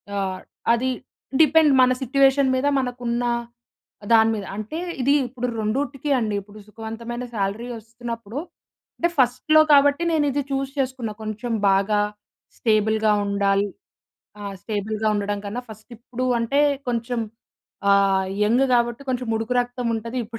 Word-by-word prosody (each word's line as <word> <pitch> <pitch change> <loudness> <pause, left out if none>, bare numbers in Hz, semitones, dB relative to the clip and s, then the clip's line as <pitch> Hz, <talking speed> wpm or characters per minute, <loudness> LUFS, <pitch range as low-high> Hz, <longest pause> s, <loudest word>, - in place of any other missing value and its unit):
ఆహ్, 190 -2 -2 0.3
అది 250 +2 0 0.5
డిపెండ్ 310 -1 +5
మన 255 0 +5
సిట్యుయేషన్ 270 +1 +3
మీద 260 +2 +1
మనకు 250 -1 -4
ఉన్న 235 +1 0 0.9
దాని 225 0 +6
మీద. 205 -2 -5
అంటే 215 +10 -5 0.2
ఇది 275 +3 +3
ఇప్పుడు 250 0 -4
రెండిటికీ 275 +6 -2
అండి 215 -3 -1
ఇప్పుడు 205 +2 -14
సుఖవంతమైన 230 +3 -6
శాలరీ 205 +3 -2
వస్తున్నప్పుడు 230 +1 -7 0.6
అంటే 345 - +1
ఫస్ట్‌లో 255 +5 +4
కాబట్టి 285 +3 +5
నేను 310 -2 +2
ఇది 285 +2 0
చూస్ 270 0 -1
చేసుకున్న 260 -4 -2
కొంచెం 215 +2 -4 0.2
బాగా 200 +2 +2 0.6
స్టేబుల్‌గా 220 -1 +2
ఉండాలి. 200 0 +1 0.7
ఆ - - -7 0.2
స్టేబుల్‌గా 215 0 -2
ఉండడం 205 0 -1
కన్నా 215 +5 -4
ఫస్ట్ 220 +3 -13
ఇప్పుడు 250 +2 -4
అంటే 275 +5 +1 0.3
కొంచెం 235 0 -2 0.7
ఆహ్, 195 -1 +3 0.2
యంగ్ 240 +5 +3
కాబట్టి 240 +1 +1
కొంచెముడుకు 230 -2 -1
రక్తం 245 0 -4
ఉంటది. 230 +3 -6
ఇప్పుడే 230 +1 -8
235 Hz, 130 wpm, -23 LUFS, 215-255 Hz, 0.9 s, దాని